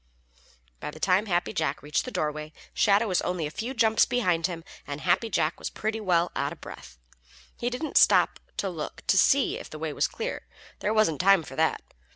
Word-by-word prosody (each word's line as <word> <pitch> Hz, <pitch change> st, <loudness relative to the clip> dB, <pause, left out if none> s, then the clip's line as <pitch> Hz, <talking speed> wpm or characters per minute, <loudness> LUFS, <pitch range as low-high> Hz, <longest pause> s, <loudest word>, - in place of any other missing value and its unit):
By -, -, -5 dB
the 155 Hz, -, -10 dB
time 190 Hz, +5 st, +2 dB
Happy 175 Hz, +2 st, 0 dB
Jack 160 Hz, -5 st, -2 dB
reached 150 Hz, 0 st, -1 dB
the 255 Hz, -, -6 dB
dooryard, 150 Hz, -2 st, -3 dB, 0.2 s
Shadow 210 Hz, +2 st, +3 dB
was 185 Hz, -3 st, +1 dB
only 180 Hz, -3 st, -2 dB
a 150 Hz, -, -4 dB
few 240 Hz, -, -5 dB
jumps 220 Hz, -2 st, +4 dB
behind 180 Hz, -10 st, +1 dB
him, 170 Hz, -3 st, -6 dB, 0.2 s
and 145 Hz, +1 st, -5 dB
Happy 185 Hz, +5 st, +1 dB
Jack 165 Hz, -4 st, 0 dB
was -, -, -4 dB
pretty 220 Hz, +1 st, -3 dB
well 175 Hz, -3 st, +2 dB
out -, -, -1 dB
of -, -, -10 dB
breath. -, -, -11 dB, 0.6 s
He 240 Hz, -, -2 dB
didn't 250 Hz, +6 st, -2 dB
stop -, -, +5 dB, 0.2 s
to 200 Hz, -, -1 dB
look 165 Hz, -5 st, -6 dB
to -, -, +3 dB
see 270 Hz, +8 st, +3 dB
if -, -, -10 dB
the 155 Hz, -, -8 dB
way 155 Hz, -1 st, -4 dB
was -, -, +1 dB
clear. 470 Hz, +2 st, -5 dB, 0.3 s
There 210 Hz, -, -1 dB
wasn't 215 Hz, -9 st, +2 dB
time 195 Hz, -2 st, +5 dB
for 135 Hz, -, -10 dB
that. 160 Hz, +2 st, +1 dB
180 Hz, 205 wpm, -27 LUFS, 155-220 Hz, 0.6 s, stop